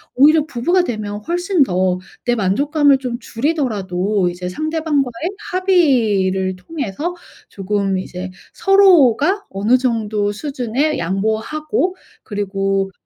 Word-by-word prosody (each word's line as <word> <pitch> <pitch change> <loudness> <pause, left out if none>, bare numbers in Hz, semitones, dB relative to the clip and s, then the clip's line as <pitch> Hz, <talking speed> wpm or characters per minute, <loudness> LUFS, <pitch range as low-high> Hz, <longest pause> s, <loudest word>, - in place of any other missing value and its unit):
오히려 300 +3 +5
부부가 330 +6 +1
되면 210 -7 -4
훨씬 355 -1 +2
더 185 -4 0 0.3
내 240 - +2
만족감을 280 - +2
좀 250 -3 -4
줄이더라도 210 - -1
이제 180 +1 -5
상대방과의 310 - -1 0.2
합의를 225 - +2
통해서 295 - -4 0.3
조금 195 -1 -1
이제 185 0 -6 0.2
서로가 375 - +4
어느 210 +6 +2
정도 220 -5 -1
수준에 275 +3 -2
양보하고 220 - -1 0.3
그리고 195 -1 -2
240 Hz, 255 characters per minute, -18 LUFS, 195-310 Hz, 0.3 s, 오히려